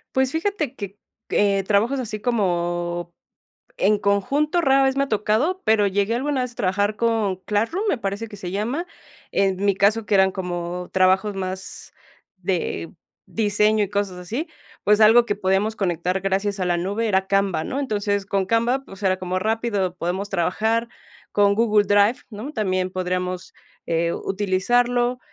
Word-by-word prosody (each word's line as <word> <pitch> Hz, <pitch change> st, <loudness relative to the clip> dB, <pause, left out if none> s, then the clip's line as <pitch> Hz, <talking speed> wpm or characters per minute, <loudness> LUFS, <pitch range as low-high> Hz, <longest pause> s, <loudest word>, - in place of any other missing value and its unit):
Pues, 265 Hz, +1 st, +2 dB
fíjate 325 Hz, -, -1 dB
que, 200 Hz, -4 st, -7 dB, 0.3 s
eh, 200 Hz, -1 st, +2 dB
trabajos 215 Hz, +8 st, +2 dB
así 215 Hz, -3 st, -5 dB
como 175 Hz, -6 st, -1 dB, 0.6 s
en 215 Hz, -, +3 dB
conjunto, 280 Hz, -, +1 dB
rara 270 Hz, -3 st, +4 dB
vez 265 Hz, 0 st, +2 dB
me 275 Hz, -, +2 dB
ha -, -, -10 dB
tocado, 220 Hz, -, +1 dB
pero 215 Hz, -2 st, +4 dB
llegué 200 Hz, +3 st, 0 dB
alguna 265 Hz, +1 st, 0 dB
vez 250 Hz, -, -4 dB
a -, -, -22 dB
trabajar 205 Hz, +2 st, 0 dB
con 225 Hz, -5 st, +1 dB
Classroom, 225 Hz, -, -1 dB
me 280 Hz, -, +1 dB
parece 200 Hz, +2 st, -3 dB
que 205 Hz, -, -10 dB
se 180 Hz, -2 st, -6 dB
llama. 240 Hz, -, -2 dB, 0.5 s
En 195 Hz, -1 st, +2 dB
mi 200 Hz, -1 st, +3 dB
caso, 210 Hz, +3 st, +2 dB
que -, -, +1 dB
eran 190 Hz, -1 st, +5 dB
como 180 Hz, -1 st, -4 dB
trabajos 190 Hz, +2 st, +3 dB
más 190 Hz, 0 st, -6 dB, 0.4 s
de 180 Hz, -2 st, -3 dB, 0.3 s
diseño 210 Hz, 0 st, +2 dB
y -, -, -6 dB
cosas 200 Hz, -3 st, -2 dB
así, 230 Hz, -, -4 dB, 0.4 s
pues, 210 Hz, +1 st, +4 dB
algo 230 Hz, +2 st, +7 dB
que 205 Hz, -, 0 dB
podíamos 200 Hz, +2 st, 0 dB
conectar 180 Hz, -1 st, -1 dB
gracias 195 Hz, +1 st, -1 dB
a -, -, +1 dB
la 175 Hz, -1 st, +1 dB
nube 205 Hz, +6 st, -1 dB
era 190 Hz, -1 st, +1 dB
Canva, 195 Hz, -5 st, +1 dB
¿no? 275 Hz, -, -3 dB
Entonces, 205 Hz, -5 st, -1 dB
con 195 Hz, -1 st, 0 dB
Canva, 240 Hz, +5 st, +1 dB
pues 195 Hz, +1 st, -13 dB
era 190 Hz, -1 st, +2 dB
como 185 Hz, 0 st, -2 dB
rápido, 215 Hz, -4 st, -1 dB
podemos 185 Hz, +4 st, -3 dB
trabajar 220 Hz, +6 st, 0 dB, 0.4 s
con 200 Hz, -1 st, +4 dB
Google 215 Hz, -3 st, +3 dB
Drive, 205 Hz, +4 st, +4 dB
¿no?, 225 Hz, +8 st, -7 dB
también 185 Hz, -6 st, -1 dB
podríamos, 180 Hz, 0 st, -3 dB, 0.3 s
eh, 170 Hz, 0 st, 0 dB
utilizarlo. 240 Hz, +6 st, +1 dB
205 Hz, 165 wpm, -22 LUFS, 185-230 Hz, 0.6 s, algo